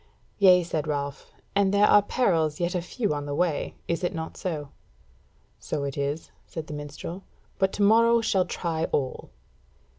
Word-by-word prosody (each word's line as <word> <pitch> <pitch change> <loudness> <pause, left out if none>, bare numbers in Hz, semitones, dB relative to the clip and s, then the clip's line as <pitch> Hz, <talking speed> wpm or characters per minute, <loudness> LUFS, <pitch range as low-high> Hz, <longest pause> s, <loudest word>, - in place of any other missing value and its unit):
"Yea," 180 -3 +7
said 160 -3 -3
Ralph, 140 -2 -4 0.2
"and 200 -1 +3
there 205 +1 +5
are 205 - +7
perils 170 -9 +1
yet 175 0 0
a 180 - 0
few 205 +1 -2
on 145 -1 -4
the 145 - -2
way, 170 -2 0
is 170 +2 -1
it 175 - -1
not 160 0 -5
so?" 150 -6 -4 0.9
"So 150 -2 -3
it 140 -1 -3
is," 145 +2 -3 0.2
said 160 -2 -6
the 150 - -8
minstrel; 150 +5 -7 0.4
"but 190 -1 +2
to 205 - 0
morrow 230 +3 +5
shall 195 -5 +2
try 165 -2 -2
all." 130 -3 -2
170 Hz, 175 wpm, -26 LUFS, 150-195 Hz, 0.9 s, Yea